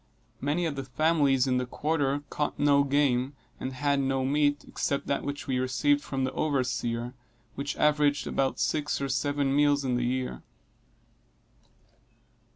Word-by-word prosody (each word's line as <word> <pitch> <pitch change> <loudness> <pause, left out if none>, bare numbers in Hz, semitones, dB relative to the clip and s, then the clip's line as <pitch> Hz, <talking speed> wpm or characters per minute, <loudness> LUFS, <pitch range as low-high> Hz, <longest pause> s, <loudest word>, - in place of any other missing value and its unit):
Many 150 +5 0
of 155 -3 -2
the 135 -1 -5
families 140 -1 +2
in 130 -1 +1
the 125 - 0
quarter 145 0 -1
caught 150 - -2
no 140 -1 +4
game, 140 -1 +1 0.2
and 130 - -4
had 140 +1 +1
no 135 -1 0
meat, 145 +1 +1
except 140 - -2
that 140 - -1
which 145 0 -5
we 130 -2 0
received 135 +3 +2
from 135 -2 -3
the 130 - 0
overseer, 125 -4 -1 0.4
which 140 +1 -4
averaged 150 -1 +2
about 135 -1 -1
six 150 -1 0
or 140 0 -2
seven 140 0 0
meals 145 -1 +3
in 125 -2 +1
the 120 - -1
year. 125 - -2
140 Hz, 155 wpm, -28 LUFS, 130-145 Hz, 0.4 s, no